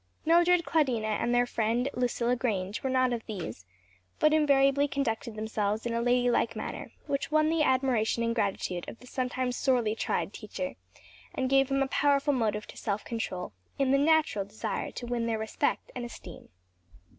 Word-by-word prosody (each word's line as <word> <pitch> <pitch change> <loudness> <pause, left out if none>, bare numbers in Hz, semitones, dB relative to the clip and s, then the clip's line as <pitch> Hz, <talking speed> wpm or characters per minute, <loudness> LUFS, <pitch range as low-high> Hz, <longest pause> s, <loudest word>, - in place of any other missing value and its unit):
Mildred, 345 +1 +4
Claudina 255 -9 +1
and 240 - 0
their 245 0 +3
friend 235 +2 0
Lucilla 245 0 0
Grange 210 -5 -2
were 265 - -1
not 255 -1 +2
of 230 -2 -3
these; 115 - -6 0.5
but 305 0 +4
invariably 280 -2 +4
conducted 235 -5 -2
themselves 215 0 -2
in 235 - -1
a 230 - 0
ladylike 245 -1 +2
manner - - -6
which 280 -2 -2
won 310 +1 +3
the 330 -1 +1
admiration 255 -5 +2
and 230 0 +1
gratitude 195 -5 -1
of - - -10
the 250 - -16
sometimes 250 0 -2
sorely 245 -5 +2
tried 215 -2 -2
teacher, 195 -4 -5 0.6
and 260 0 -1
gave 270 0 +4
him 275 0 +2
a - - -2
powerful 285 +1 +2
motive 215 -4 0
to - - -12
self 210 -1 -3
control, 185 - -4 0.2
in 275 -1 +2
the 275 - +4
natural 305 -8 +3
desire 205 +3 -4
to 245 - -7
win 240 -1 -1
their 225 -1 0
respect 220 +6 -2
and 250 - -4
esteem. 215 -7 -10
245 Hz, 175 wpm, -29 LUFS, 220-275 Hz, 0.6 s, Mildred